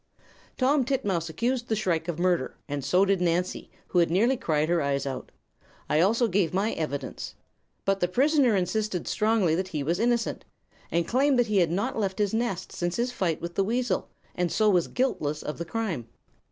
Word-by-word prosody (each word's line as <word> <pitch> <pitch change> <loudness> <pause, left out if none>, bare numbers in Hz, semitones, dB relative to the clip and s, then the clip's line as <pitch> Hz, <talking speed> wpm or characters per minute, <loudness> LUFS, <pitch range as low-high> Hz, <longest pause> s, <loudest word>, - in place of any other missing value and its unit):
"Tom 270 +2 +3
Titmouse 200 - -1
accused 240 +9 -1
the 220 - +2
shrike 175 -6 -1
of 170 -3 -3
murder, 175 -6 +1
and 145 -1 -3
so 185 +7 +3
did 195 -2 +1
Nancy, 180 +1 -1 0.2
who 180 - +2
had 170 - +3
nearly 225 +10 +3
cried 155 -9 0
her 170 0 +2
eyes 140 -1 0
out. 135 -2 -5 0.6
I 150 - +2
also 225 +7 +3
gave 185 -4 +1
my 205 +4 +1
evidence. 145 -4 -4 0.5
But 195 0 +1
the 180 - +2
prisoner 265 - +3
insisted 190 0 -1
strongly 215 -6 +2
that 185 +3 0
he 155 -6 -3
was 170 +6 0
innocent, 235 0 0 0.5
and 170 0 0
claimed 265 +1 +3
he 215 -4 0
had 170 -3 +3
not 225 - -1
left 195 -3 -1
his 205 -1 0
nest 220 -6 -2
since 175 0 -2
his 245 +1 0
fight 180 -9 -1
with 170 +1 -5
the 195 - +1
weasel, 230 -1 -1 0.2
and 180 -1 -1
so 215 -1 +3
was 180 -3 +2
guiltless 155 - -1
of 150 - -5
the 170 - -3
crime. 170 - -3
185 Hz, 195 wpm, -27 LUFS, 170-230 Hz, 0.6 s, Tom